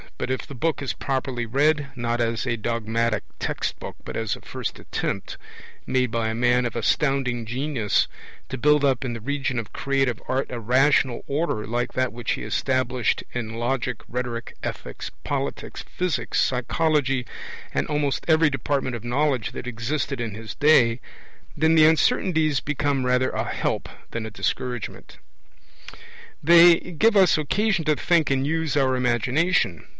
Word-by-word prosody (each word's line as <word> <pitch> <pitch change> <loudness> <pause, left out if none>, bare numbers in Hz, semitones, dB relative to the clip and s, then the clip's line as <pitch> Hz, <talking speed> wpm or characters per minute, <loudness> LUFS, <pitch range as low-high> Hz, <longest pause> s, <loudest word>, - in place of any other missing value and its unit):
But, 130 - -3
if 130 - -2
the 140 - -10
book 155 +3 -1
is 135 - -2
properly 130 -3 -2
read, 145 +4 +2
not 120 -1 -1
as 115 0 -1
a 120 -3 0
dogmatic 115 -1 -1 0.2
text - - -3
book - - -7
but - - -6
as 110 -2 -1
a - - -14
first - - -5
attempt, 100 - -4 0.5
made 130 -2 +1
by 115 -1 0
a 110 - -2
man 125 +1 +3
of 120 - -3
astounding 125 0 +1
genius, 125 -2 0 0.4
to 130 - -4
build 150 +2 +4
up 135 -1 +2
in 125 -2 -3
the 115 - -5
region 135 +2 -2
of 115 -3 -4
creative 135 -4 0
art 130 +1 -1
a 120 - -4
rational 130 +1 +3
order 140 -7 -1
like 120 +3 -2
that 130 -1 0
which 120 0 -3
he - - -5
established 130 -2 0
in 115 -2 -4
logic, 120 0 -2
rhetoric, 120 -1 -4
ethics, - - -5
politics, - - -3
physics, 180 -5 -1
psychology, 135 0 +1 0.5
and - - 0
almost 145 -2 0
every 160 -1 +5
department 135 -2 -1
of 115 - -7
knowledge 130 -1 0
that - - -6
existed 125 +3 -2
in 110 -4 -4
his 110 -1 -7
day, 130 -6 +4 0.6
then 160 +2 +3
the 160 -1 +7
uncertainties 155 -1 +3
become 145 -2 -1
rather 125 +1 +2
a - - -1
help - - -2 0.2
than 115 -1 -4
a - - -9
discouragement. 120 +2 -4 1.3
They 170 +2 +8
give 210 +6 +1
us 185 -5 +5
occasion 190 +3 +1
to 155 -1 +3
think 170 0 +2
and 135 0 +1
use 160 -1 0
our 130 -2 +3
imagination. 125 - +1
130 Hz, 160 wpm, -24 LUFS, 120-150 Hz, 1.3 s, They